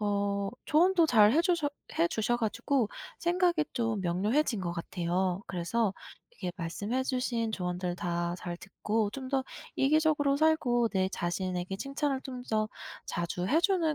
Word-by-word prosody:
어 200 -1 0 0.2
조언도 340 +2 +4
잘해 230 +2 +6
주셔 340 -5 +2 0.3
해 335 - +5
주셔 240 -5 0
가지고 235 +2 0 0.3
생각이 345 -2 +2
좀 225 -4 0
명료해진 210 - +1
것 175 -2 -2
같아요. 175 +2 -1
그래서 195 +4 0 0.4
이게 180 - -3
말씀해 205 +10 -2
주신 245 -4 -1
조언들 180 -2 -2
다 175 -1 -1
잘 175 -1 -5
듣고 210 +3 -1
좀 260 +3 -6
더 265 -1 0 0.3
이기적으로 295 0 +3
살고 265 -7 +3
내 190 -2 +1
자신에게 180 +1 -2
칭찬을 275 +3 -1
좀 255 -2 -6
더 215 -1 +1 0.4
자주 175 +1 -2
해 305 - +3
주는 345 -4 +2
225 Hz, 290 characters per minute, -30 LUFS, 185-280 Hz, 0.4 s, 잘해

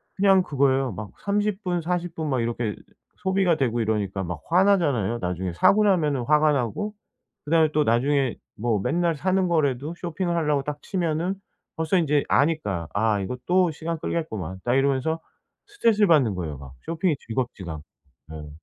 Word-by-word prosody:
그냥 195 -1 +5
그거예요. 135 -3 +1
막 100 +2 -7
30 205 0 0
분, 175 -2 -1
40 175 +1 -2
분 155 -2 -3
막 130 -3 +1
이렇게 115 -2 -2 0.4
소비가 190 -3 +2
되고 120 -4 0
이러니까 100 -3 -1
막 85 -2 -5
화나잖아요. 165 - +3
나중에 90 0 -3
사고 210 - +4
나면은 155 -10 +2
화가 150 +3 +3
나고 140 - -2 0.5
그다음에 160 0 +3
또 150 - +3
나중에 135 +2 +1 0.2
뭐 110 -1 0
맨날 170 - +1
사는 185 +4 +1
거라도 150 -2 0
쇼핑을 175 0 -2
하려고 150 -4 +1
딱 150 0 -5
치면은 175 -1 -1 0.4
벌써 160 +3 +1
인제 150 -4 +2
아니까 105 - +1
'아 105 -1 +1
이거 125 +7 -4
또 180 -1 +3
시간 165 +2 -4
끌겠구만.' 100 - -4
딱 120 +1 +1
이러면서 140 +4 +1 0.5
스트레스를 230 - +2
받는 135 - +4
거예요, 80 -6 -4
막. 65 -1 -11
쇼핑이 165 -1 0
즐겁지가 100 - -4 0.5
예. 75 -1 -8
150 Hz, 345 characters per minute, -24 LUFS, 115-175 Hz, 0.5 s, 그냥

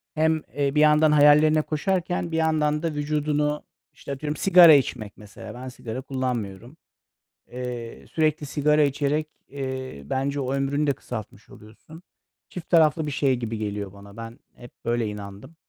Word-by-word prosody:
hem, 160 0 +2
eee, 140 0 0
bir 150 - +4
yandan 150 0 +5
hayallerine 150 +1 +5
koşarken 175 +2 -2
bir 160 - -1
yandan 155 -1 +1
da 165 -2 -1
vücudunu 150 0 -1 0.3
İşte, - - -9
atıyorum 150 +2 -4
sigara 175 -4 +8
içmek 110 -7 0
mesela. 105 -1 -11
Ben 130 +1 -8
sigara 125 0 -7
kullanmıyorum. 125 - -4 0.7
Eee, 125 -2 -7
sürekli 155 -2 0
sigara 150 +1 +2
içerek, 145 +2 0 0.2
eee, 130 - -6
bence 140 - -2
o 135 0 -2
ömrünü 140 +2 0
de 140 - +3
kısaltmış 110 -4 -9
oluyorsun. 115 +10 -15 0.5
Çift 180 - -9
taraflı 160 -2 +4
bir - - -3
şey 135 -1 +1
gibi 115 -2 -4
geliyor 105 -2 -4
bana. 100 +1 -14
Ben 115 +1 -9 0.2
hep 120 0 -13
böyle 120 -1 0
inandım. 105 +8 -9
140 Hz, 155 wpm, -24 LUFS, 120-155 Hz, 0.7 s, sigara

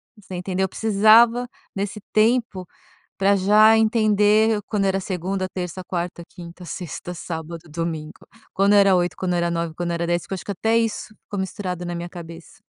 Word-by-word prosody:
você 195 -3 -10
entendeu? 185 +1 -1
Eu - - -5
precisava 225 +4 +4 0.3
nesse 200 +1 -3
tempo 220 -4 +1 0.5
pra 195 +1 +3
já 210 +3 +5
entender 215 -1 +3
quando 205 -2 0
era 195 0 +1
segunda, 185 0 -3
terça, 180 0 -5
quarta, 175 -1 -4
quinta, 175 +1 -11
sexta, 175 0 -6
sábado, 165 -1 -6
domingo. 160 -1 -4 0.4
Quando 200 +1 +3
era 195 -2 +6
8, 175 0 0
quando 180 -1 -1
era 170 0 +1
9, 170 -1 -2
quando 175 0 -3
era 170 0 -2
10, 175 0 -1
que - - -5
eu - - 0
acho 185 - -9
que - - -3
até 225 +4 +1
isso 225 -1 -2
ficou 200 - -6
misturado 185 -2 -4
na 175 0 -4
minha 170 +1 -5
cabeça. 170 -1 -11
190 Hz, 180 wpm, -22 LUFS, 175-210 Hz, 0.5 s, era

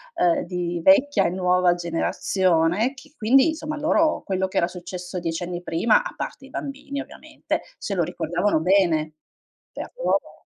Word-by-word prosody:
ehm, 175 -1 +2
di 175 -1 -3
vecchia 285 -7 +5
e - - +2
nuova 180 -1 +2
generazione, 175 +5 +1
che 285 +3 -15
quindi 265 +8 +4
insomma 305 -1 -4
loro 310 +1 +2
quello 190 -1 -1
che 190 - -5
era 170 - +3
successo 180 0 -7
10 165 -1 -3
anni 175 0 -4
prima, 175 - +2
a - - -7
parte 270 - -6
i - - -14
bambini 280 +1 -5
ovviamente, - - -5 0.2
se 200 - -4
lo 175 - +1
ricordavano 175 +1 0
bene. 165 -4 +2 0.6
Per - - -7
loro - - -1
185 Hz, 160 wpm, -23 LUFS, 175-270 Hz, 0.6 s, vecchia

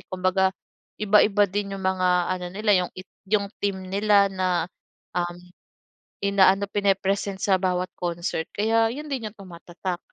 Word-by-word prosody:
Kumbaga, 185 +1 +1 0.5
iba-iba 210 0 +5
din 200 0 -2
'yong 195 - -8
mga 185 -1 +1 0.2
ano 180 -1 -4
nila 210 +2 0
'yong - - -7
it 185 +1 -9 0.2
'yong 200 -2 +2
theme 190 -2 -1
nila 200 0 +4
na, 185 -3 0 0.5
um, 175 0 -2 0.9
ina-ano, 200 0 +4
pine-present 195 -1 0
sa 195 -2 +3
bawat 180 -1 0
concert 170 -1 -2
kaya 225 +2 +2
'yon 300 +3 -7
din 265 -5 -3
'yong 210 - -26
tumatatak. 175 0 -6
195 Hz, 140 wpm, -24 LUFS, 185-205 Hz, 0.9 s, iba-iba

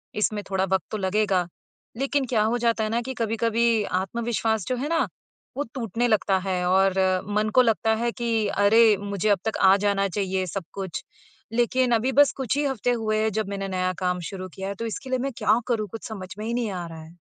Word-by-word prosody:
इसमें 210 0 0
थोड़ा 190 -1 +1
वक़्त 190 0 0
तो 215 - -2
लगेगा। 190 -2 +1 0.5
लेकिन 275 +1 0
क्या 225 -3 +2
हो 225 +3 +1
जाता 230 -1 +1
है 215 - -2
ना 235 +1 +1
कि, 260 +2 -5
कभी-कभी 230 -1 +1
आत्मविश्वास 220 +2 -1
जो 255 - 0
है 285 +5 -3
ना 330 0 +1 0.5
वो 285 - 0
टूटने 235 -1 -1
लगता 205 -4 +2
है, 180 -1 0
और 190 +1 +4 0.4
मन 215 +1 +1
को 255 - +8
लगता 225 -1 +2
है 235 +1 -1
कि 230 -3 0
अरे! 210 +2 +5
मुझे 200 +1 -2
अब 200 - +3
तक 220 - -1
आ 190 0 +7
जाना 200 -1 +2
चाहिए 190 -1 -1
सब 190 +2 -4
कुछ, 190 -3 -5 0.5
लेकिन 245 +1 +2
अभी 245 +4 +1
बस 285 +1 +6
कुछ 265 0 -1
ही 290 - +1
हफ़्ते 245 -3 0
हुए 215 -2 0
हैं 220 - +1
जब 215 -1 -1
मैंने 195 -1 -3
नया 185 -1 -1
काम 180 -1 0
शुरू 185 -1 -6
किया 190 0 -4
है। 200 - -4
तो 230 - -5
इसके 260 +4 -6
लिए 255 - +1
मैं 275 +2 -2
क्या 225 - +3
करूँ, 220 -4 0
कुछ 225 - -7
समझ 190 -4 -7
में 215 - -4
ही 235 - -2
नहीं 240 -3 -1
आ 180 -2 -4
रहा 165 -1 -9
है? 165 +2 -15
215 Hz, 225 wpm, -25 LUFS, 195-235 Hz, 0.5 s, को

